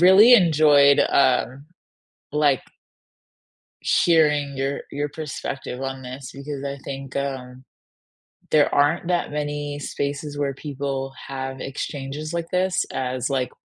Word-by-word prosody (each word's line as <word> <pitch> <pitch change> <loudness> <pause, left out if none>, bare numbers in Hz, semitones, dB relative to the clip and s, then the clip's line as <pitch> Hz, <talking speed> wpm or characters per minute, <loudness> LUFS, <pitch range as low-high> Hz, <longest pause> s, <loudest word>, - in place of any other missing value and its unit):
really 195 +7 +8
enjoyed, 150 -7 +6
um, 135 +1 +2 0.7
like 145 -3 +2 1.4
hearing 150 -4 +3
your 135 +1 -2
your 145 +1 -2
perspective 135 -3 -6
on 135 0 -4
this 130 0 -8
because 140 0 -6
I 140 0 -4
think, 135 -1 -6
um, 130 -2 -4 0.9
there 150 -2 +4
aren't 145 +4 +2
that 175 -1 0
many 145 -1 -3
spaces 145 +1 -4
where 140 -1 -1
people 135 -1 -4 0.2
have 135 -1 -5
exchanges 140 +3 -5
like 170 -1 -2
this 185 0 +1
as 130 0 -2
like 130 -2 0
140 Hz, 120 wpm, -23 LUFS, 135-150 Hz, 1.4 s, really